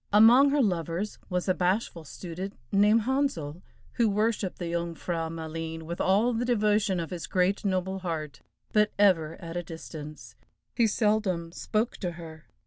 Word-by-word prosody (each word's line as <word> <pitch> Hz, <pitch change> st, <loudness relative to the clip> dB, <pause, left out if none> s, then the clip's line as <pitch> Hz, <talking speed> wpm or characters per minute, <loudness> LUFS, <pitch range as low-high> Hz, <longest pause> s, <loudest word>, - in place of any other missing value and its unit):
Among 235 Hz, +7 st, +7 dB
her 285 Hz, -1 st, +3 dB
lovers 175 Hz, 0 st, -2 dB
was 180 Hz, 0 st, -1 dB
a 185 Hz, -, +4 dB
bashful 180 Hz, -2 st, -1 dB
student 185 Hz, +5 st, -7 dB
named 210 Hz, +3 st, +5 dB
Handsel, 215 Hz, -, -1 dB, 0.3 s
who 235 Hz, -3 st, +2 dB
worshiped 210 Hz, -2 st, 0 dB
the 175 Hz, -2 st, -4 dB
Jung 170 Hz, 0 st, -2 dB
frau 165 Hz, -1 st, -3 dB
Maleen 160 Hz, 0 st, -5 dB
with 170 Hz, +2 st, -4 dB
all 210 Hz, +6 st, +3 dB
the 230 Hz, +1 st, -1 dB
devotion 210 Hz, -5 st, +2 dB
of 165 Hz, +1 st, -4 dB
his 175 Hz, -2 st, -5 dB
great 185 Hz, +2 st, +1 dB
noble 190 Hz, -1 st, -1 dB
heart, 160 Hz, -5 st, -4 dB, 0.3 s
but 210 Hz, -1 st, +4 dB
ever 165 Hz, -6 st, +3 dB
at 170 Hz, -2 st, -8 dB
a 175 Hz, -, -1 dB
distance. 155 Hz, -6 st, -9 dB, 0.4 s
He 235 Hz, -2 st, +3 dB
seldom 210 Hz, -6 st, 0 dB
spoke 215 Hz, +6 st, -1 dB
to 180 Hz, -3 st, -3 dB
her. 160 Hz, -2 st, -11 dB
185 Hz, 160 wpm, -28 LUFS, 165-210 Hz, 0.4 s, Among